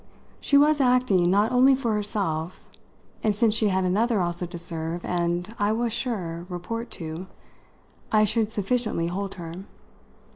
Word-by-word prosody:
She 280 - +3
was 295 0 +4
acting 250 -9 +3
not 205 +5 +3
only 260 +2 +5
for 240 -4 -1
herself, 195 -6 -3 0.5
and 215 -2 +1
since 220 0 +3
she 220 -1 +2
had 190 -1 +1
another 215 +5 +1
also 175 0 -1
to 175 0 -8
serve 165 0 -3
and, 175 0 -1
as - - -10
I 205 +1 +2
was 230 0 -1
sure, 185 -9 -3
report 210 +7 -5
to, 165 +2 -6 0.8
I 215 -1 +5
should 215 0 +1
sufficiently 215 -5 -1
hold 195 +2 -4
her. 165 -3 -7
205 Hz, 155 wpm, -25 LUFS, 175-230 Hz, 0.8 s, only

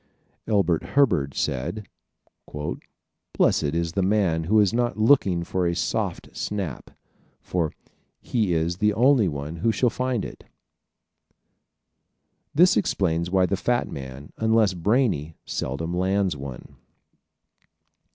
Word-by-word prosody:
Elbert 90 -6 +2
Hubbard 90 - +1
said, 95 +12 -2 1.5
"Blessed - - +3
is 85 -1 -1
the 95 - -1
man 95 -5 +1
who 110 +5 +4
is 105 0 +3
not 120 -1 0
looking 110 -7 +3
for 90 +1 -1
a 85 - 0
soft - - -3
snap, 95 -11 -4 0.5
for 85 -4 -2 0.5
he 110 -7 -1
is 85 +1 0
the 105 +1 +2
only 125 -2 +4
one 75 +1 -5
who 115 +7 +1
shall 120 +1 +1
find 125 -4 -1
it." - - -10 2.1
This 180 +4 +6
explains 85 -5 0
why 95 0 +3
the 100 - 0
fat 120 +5 -1
man, 70 +1 -8
unless 110 -3 +3
brainy, 90 - 0
seldom 80 +6 -3
lands 95 -1 +1
one. 70 -3 -9
95 Hz, 120 wpm, -24 LUFS, 80-110 Hz, 2.1 s, This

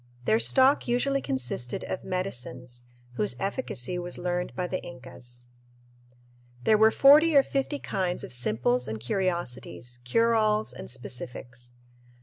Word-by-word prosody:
Their 220 - +3
stock 265 +4 +4
usually 275 +3 +1
consisted 125 -1 -2
of - - -4
"medicines," 125 -9 -4 0.4
whose 105 +2 +1
efficacy 190 - -2
was 175 0 -4
learned 180 0 -2
by 180 - -1
the 185 +1 -3
Incas. 125 -1 -9 1.2
There 215 - +5
were 220 +1 +6
forty 295 +6 +6
or 275 - +7
fifty 275 +2 -2
kinds 185 -8 -2
of - - -6
simples 125 +1 +1
and 110 0 -4
curiosities, 125 - -3
cure 230 - +2
alls, 215 -1 +2
and - - -9
specifics. 120 -1 -6
175 Hz, 135 wpm, -27 LUFS, -, 1.2 s, or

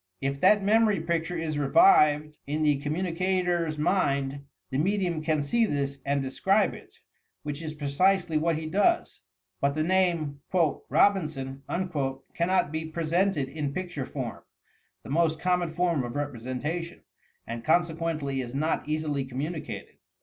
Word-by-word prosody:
If 140 +1 -2
that 210 -1 +5
memory 215 -1 +4
picture 170 +1 -1
is 155 -2 -2
revived 150 - +5
in 150 +2 -1
the 145 -2 +2
communica 180 +4 -1
tor's 170 -3 0
mind, 140 -5 0 0.3
the 130 - 0
medium 180 -2 0
can 155 -2 0
see 230 +11 +2
this 140 -3 -2
and 140 0 0
describe 195 +10 +2
it, - - -12 0.3
— - - -51
which 145 +1 -5
is 155 -1 -5
precisely 165 +4 +1
what 165 +2 +2
he 160 - -5
does; 205 - +1 0.4
but 140 0 +1
the 155 - +1
name 170 -5 +1 0.5
"Robin 195 -6 +4
son" 135 -2 -7 0.7
cannot 175 -2 +1
he 160 0 -2
presented 170 -1 0
in 140 0 -4
picture 180 -7 -4
form 130 -5 -5 0.6
(the - - -8
most 160 0 +2
common 180 -1 +1
form 170 -4 +1
of 120 +1 -6
representation) 145 +5 -4 0.4
and 115 0 -6
consequently 160 -4 0
is 120 0 -7
not 155 +2 -1
easily 150 -2 -1
communicated. 145 +5 -5
155 Hz, 145 wpm, -27 LUFS, 140-175 Hz, 0.7 s, that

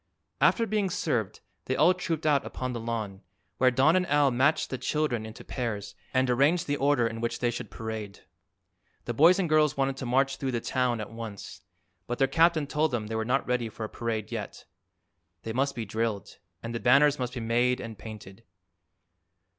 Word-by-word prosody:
After 230 - +4
being 210 -2 0
served 120 - -2 0.2
they - - -1
all 180 - +5
trooped 165 -4 -3
out 145 -3 +3
upon 130 -1 -4
the 120 - -4
lawn, 110 -4 -4 0.4
where 130 - +5
Don 135 +6 +4
and 185 -1 +2
Al 145 -1 +3
matched 140 +6 +2
the 130 - -3
children 125 -8 -1
into 110 - -10
pairs 105 -5 -4 0.2
and 130 0 +2
arranged 140 +8 +3
the 145 - 0
order 140 -3 +2
in 115 0 -3
which 115 - -1
they 120 -1 0
should 120 -3 -6
parade. 110 -2 -6 0.8
The 120 - -2
boys 165 +9 +6
and 190 -3 0
girls 150 -2 +3
wanted 135 0 0
to 130 - -5
march 135 +2 +2
through 135 -2 -3
the 120 - 0
town 125 -1 0
at 105 - -7
once, 115 -3 -8 0.5
but 120 - -3
their 135 - +4
captain 160 +2 +3
told 150 +2 +1
them 120 -5 -2
they 110 +1 -5
were 110 - 0
not 130 +4 0
ready 125 -2 -1
for 110 - -7
a 110 - -4
parade 115 -3 -4
yet. - - -6 0.8
They 110 - -4
must 135 +3 0
be 115 -2 -4
drilled, 110 -1 -3 0.2
and 115 0 -5
the 115 - -2
banners 140 +4 +4
must 125 +1 -3
be - - -3
made 120 +2 +1
and 115 -1 -7
painted. 105 -1 -11
125 Hz, 200 wpm, -28 LUFS, 115-145 Hz, 0.8 s, boys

